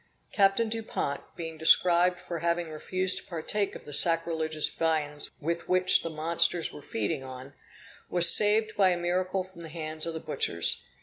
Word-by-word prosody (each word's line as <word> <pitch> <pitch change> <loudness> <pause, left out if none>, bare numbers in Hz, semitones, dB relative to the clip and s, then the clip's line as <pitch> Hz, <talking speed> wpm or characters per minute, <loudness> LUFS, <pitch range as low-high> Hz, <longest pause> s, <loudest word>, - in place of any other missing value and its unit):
Captain 200 +3 +3
Dupont, 220 -10 -3
being 165 -2 -7
prescribed 175 +2 +4
for 175 -2 -6
having 170 0 -1
refused 185 +4 0
to - - -14
partake 195 +4 -3
of - - -11
the 145 - -9
sacrilegious 160 -1 +2
viands 155 -3 -1
with 170 +2 -4
which 185 0 +4
the 165 - -5
monsters 165 +2 0
were - - -10
feeding 110 0 -3
on, 130 +1 -10 0.6
was 175 -1 +4
saved 215 +4 +3
by 195 -2 +4
a 180 - 0
miracle 185 +2 -1
from 185 -2 -14
the 165 - -9
hands 155 0 -4
of 165 - -4
the - - -4
butchers. 115 - 0
170 Hz, 170 wpm, -28 LUFS, 155-185 Hz, 0.6 s, prescribed